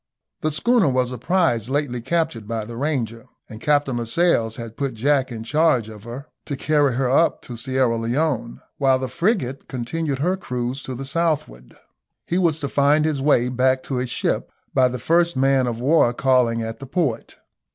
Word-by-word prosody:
The 155 - 0
schooner 225 +5 +3
was 130 -1 0
a 125 - -6
prize 125 - +1
lately 135 -3 -1
captured 145 -5 -1
by 115 -1 -3
the 115 +1 -8
Ranger, 120 -4 -2 0.2
and 110 -1 -11
Captain 145 -3 +1
Lascelles 115 -2 +1
had 115 -1 -8
put 140 -4 -3
Jack 135 +2 +1
in 110 -1 -6
charge 130 -3 +2
of 105 0 -12
her 120 +4 -7 0.2
to 140 - -3
carry 145 -2 +2
her 130 0 +1
up 140 +6 +2
to 120 - -8
Sierra 130 0 0
Leone, 120 0 -1 0.2
while 135 -2 +4
the 130 0 -3
frigate 170 - -1
continued 140 +4 -3
her 175 +7 +1
cruise 125 -4 -4
to 130 - -6
the 135 +3 -6
southward. 140 - -2 0.5
He 175 - 0
was 165 -4 +2
to 140 - -1
find 145 +2 +3
his 150 -3 0
way 135 -4 +3
back 130 +1 +1
to 135 - -3
his 125 0 -2
ship - - -1 0.2
by 130 -1 +4
the 125 0 -4
first 170 +6 +2
man 135 -1 +3
of 115 -1 -3
war 130 -2 +3
calling 125 -4 +2
at 115 0 -6
the 135 - -8
port. 135 -6 -2
130 Hz, 190 wpm, -22 LUFS, 120-150 Hz, 0.5 s, while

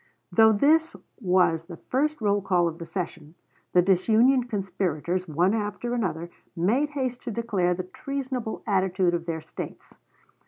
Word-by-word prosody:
] - - -49
Though 220 -1 +7
this 315 +9 +3 0.2
was 180 -5 +2
the 170 -1 -9
first 295 - -1
roll 205 -1 +2
call 180 -3 +2
of 165 +1 -5
the 170 - -7
session, 165 -4 -5 0.4
the 180 - +5
disunion 225 +8 +4
conspirators, 185 -4 -2
one 175 +6 +2
after 215 +2 -2
another, 175 -7 -2 0.2
made 225 - +1
haste 260 -4 -3
to 250 - -5
declare 200 -6 0
the 185 - -4
treasonable 255 +3 -5
attitude 190 -3 +1
of 170 0 -2
their 160 -1 -2
States. 160 - -9
195 Hz, 155 wpm, -26 LUFS, 175-240 Hz, 0.4 s, Though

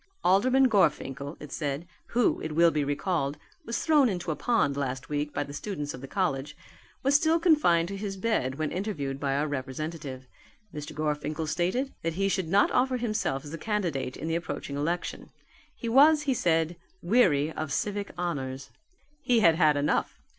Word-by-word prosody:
"Alderman 255 +8 +4
Gorfinkel," 145 - 0
it 150 -2 -10
said, 145 +1 -3 0.2
"who, 240 -1 +2
it 155 - -4
will 170 +1 +5
be 150 -2 0
recalled, 145 0 -1 0.3
was 230 0 -2
thrown 295 -5 +5
into 175 -4 -2
a - - -2
pond 230 - +1
last 130 -2 -3
week 150 0 -2
by 145 - -1
the 145 0 -9
students 145 -3 -4
of 125 - -9
the 135 - -7
college, 135 +2 -2 0.5
was 275 +2 +3
still 320 +3 +4
confined 295 - +4
to 200 - -4
his 195 -1 -4
bed 185 - 0
when 155 0 -2
interviewed 150 -9 -3
by 140 -1 0
our 145 +2 0
representative. 140 0 -5 0.5
Mr. 150 0 -7
Gorfinkel 150 +1 -2
stated 185 - -1
that 165 0 -2
he 195 +1 +1
should 190 -3 -1
not 195 +5 +3
offer 255 0 +2
himself 215 - -2
as 145 - -8
a 165 - -5
candidate 160 - -2
in 160 - -5
the 165 - -1
approaching 170 -4 -4
election. 165 +5 -3 0.5
He 235 - -6
was, 295 +6 +6
he 275 -3 +1
said, 165 -5 +1 0.3
weary 170 - +3
of 155 -2 -4
civic 205 +5 -2
honours. 135 -7 -4 0.5
He 240 -5 +3
had 170 -5 +6
had 155 -3 +3
enough. 145 +1 0
165 Hz, 180 wpm, -28 LUFS, 145-205 Hz, 0.5 s, was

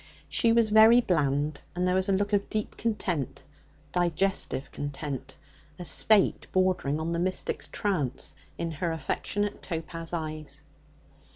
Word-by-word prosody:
She 230 - +2
was 230 -2 +3
very 220 +2 +8
bland, 150 - 0
and 180 +1 +1
there 180 - +2
was 190 +1 +1
a - - +4
look 200 +2 +1
of 200 0 +1
deep 215 -1 -2
content 190 - -2 0.5
digestive 175 -5 0
content, 145 -2 -5 0.4
a 180 - -6
state 210 +3 +3
bordering 185 -6 +1
on 160 +1 -2
the 170 - 0
mystic's 185 +1 -1
trance 160 -11 -2 0.2
in 165 -1 -2
her 165 +2 -2
affectionate 200 +6 -2
topaz 165 -1 -4
eyes. 155 -3 -5
175 Hz, 135 wpm, -28 LUFS, 155-200 Hz, 0.5 s, very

